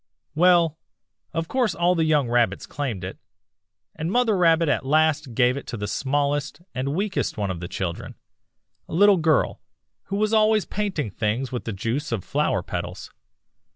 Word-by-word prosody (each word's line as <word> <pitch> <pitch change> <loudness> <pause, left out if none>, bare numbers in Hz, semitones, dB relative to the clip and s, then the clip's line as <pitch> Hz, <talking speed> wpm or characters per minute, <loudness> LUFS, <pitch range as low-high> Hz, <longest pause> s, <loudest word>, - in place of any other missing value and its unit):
"'Well, 170 -1 +4 0.5
of 165 0 -2
course 250 -1 0
all 175 +1 +3
the 165 -2 +1
young 150 -4 +2
Rabbits 120 0 +1
claimed 125 -10 -4
it, 95 - -6 0.8
and 160 +3 -3
Mother 240 -2 +3
Rabbit 165 -2 +4
at 145 - +1
last 150 -2 +1
gave 125 +2 +3
it - - -7
to 120 - -5
the 105 0 -4
smallest 140 +6 -1
and 135 +3 -2
weakest 200 - -1
one 100 -2 -1
of 90 - -5
the 85 - -5
children, 90 -2 -5 0.7
a - - -4
little 200 +2 +6
girl, 155 -3 +1 0.4
who 195 - -4
was 215 +2 +1
always 215 -1 +4
painting 190 - -2
things 115 +6 -2
with 125 - -4
the 115 - -3
juice 115 +9 -3
of 110 -6 -2
flower - - 0
petals. - - -6
150 Hz, 170 wpm, -24 LUFS, 120-175 Hz, 0.8 s, little